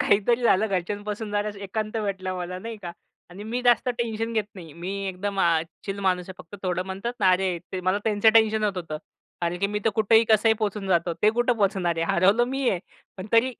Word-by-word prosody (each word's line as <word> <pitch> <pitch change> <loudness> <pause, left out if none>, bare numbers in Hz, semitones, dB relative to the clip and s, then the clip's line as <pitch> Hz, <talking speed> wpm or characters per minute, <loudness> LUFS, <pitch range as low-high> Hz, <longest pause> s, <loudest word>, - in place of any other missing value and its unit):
काहीतरी 230 +4 +2
झालं 220 -2 +4
घरच्यांपासून 205 +2 -3
जरा 205 0 0
एकांत 215 +2 -3
भेटला 190 -2 -3
मला, 180 0 -5
नाही 225 +3 -7
का? 175 -1 -6 0.4
आणि 195 +4 -9
मी 235 +3 -2
जास्त 245 +1 +3
टेन्शन 225 -1 -2
घेत 220 -2 +1
नाही, 170 -5 -10
मी 175 +4 -6 0.2
एकदम 195 +1 -3
अ, 165 -2 +3 0.2
चिल 195 0 -3
माणूस 185 -2 0
आहे. 190 - -7
फक्त 170 - -14
थोडं 185 -1 -1
म्हणतात 195 +6 -4
ना, 190 -2 +5
अरे 185 -1 +1
ते 185 - -2
मला 185 +2 +1
त्यांचं 215 0 +3
टेन्शन 220 -1 +4
होत 200 -2 -1
होतं, 165 -4 -4 0.4
कारण 170 +1 -1
की 200 - +1
मी 210 +1 -2
तर 225 - +4
कुठेही 220 +1 +4
कसंही 220 +1 +5
पोहचून 205 -2 -2
जातो. 170 -1 +2
ते 215 - +6
कुठं 240 +2 +2
पोहोचणार 195 -6 0
आहे? 165 - +1
हरवलो 200 +7 +4
मी 265 0 -1
आहे, 185 - +1 0.4
पण 185 0 -7
तरी 235 +3 +4
200 Hz, 215 wpm, -25 LUFS, 185-220 Hz, 0.4 s, ते